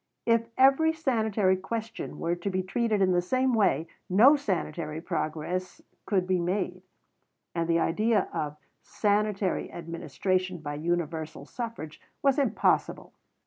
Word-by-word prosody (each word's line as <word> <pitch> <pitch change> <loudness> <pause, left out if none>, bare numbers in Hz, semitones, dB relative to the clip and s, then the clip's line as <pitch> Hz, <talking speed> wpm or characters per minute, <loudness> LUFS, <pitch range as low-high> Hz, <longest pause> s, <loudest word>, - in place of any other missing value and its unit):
If 230 -1 +3
every 275 +5 +5
sanitary 220 -10 +1
question 225 +4 -5
were 170 - -1
to 175 +3 -3
be 185 -1 -1
treated 215 +1 +1
in 185 - +3
the 175 -1 +3
same 255 +7 +1
way, 170 - +2 0.2
no 230 +11 +7
sanitary 165 - -3
progress 170 +2 -3 0.3
could 190 -3 +1
be 185 -1 +1
made; 180 +1 -2 0.7
and 170 -1 -1
the 165 - +4
idea 210 +5 +2
of 150 0 -3 0.2
"sanitary 205 -2 0
administration 175 +3 -2
by 150 -3 -5
universal 160 -2 -3
suffrage" 225 -8 -6 0.2
was 275 0 +3
impossible. 255 -7 +1
185 Hz, 130 wpm, -28 LUFS, 170-225 Hz, 0.7 s, no